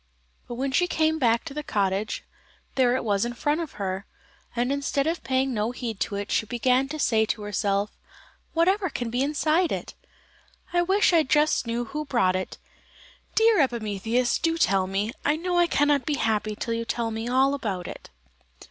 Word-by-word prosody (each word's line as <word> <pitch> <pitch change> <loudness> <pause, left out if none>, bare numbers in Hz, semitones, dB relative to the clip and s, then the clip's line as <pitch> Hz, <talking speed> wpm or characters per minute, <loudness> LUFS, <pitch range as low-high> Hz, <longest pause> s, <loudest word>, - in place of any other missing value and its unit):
But 240 - -5
when 265 +2 -2
she 355 +7 +2
came 315 -2 +1
back 235 -3 +2
to - - -6
the 300 - -3
cottage, 200 -4 -1 0.5
there 250 -2 +3
it 260 - -1
was 205 -3 +1
in 240 0 -2
front 295 +6 0
of 325 - -6
her, 195 -1 -4 0.5
and 245 +2 0
instead 280 0 0
of 330 +2 -1
paying 260 0 0
no 215 0 0
heed 235 -4 -5
to 200 - -2
it, 200 0 -4
she 220 - +1
began 250 +4 +2
to 310 +3 -5
say 225 -7 +2
to 210 - -2
herself: 205 0 0 0.6
"Whatever 370 +4 +2
can 240 -5 -4
be 245 +2 0
inside 310 +4 +1
it? - - -4 0.8
I 350 - +4
wish 380 +1 +3
I 330 - +6
just 300 -3 +2
knew 235 +1 -1
who 300 +6 -5
brought 235 -10 +2
it! 185 - -4 0.8
Dear 445 -5 +5
Epimetheus, 235 -1 0
do 330 0 +1
tell 195 - +2
me; 200 +3 -1
I 295 - +2
know 350 +2 0
I 345 - +4
cannot 290 -3 +2
be 300 - +1
happy 215 -3 0
till 230 - -3
you 230 0 -2
tell 230 0 -2
me 225 +1 -4
all 265 +2 +3
about 200 -10 -3
it." - - -9
250 Hz, 190 wpm, -25 LUFS, 215-300 Hz, 0.8 s, I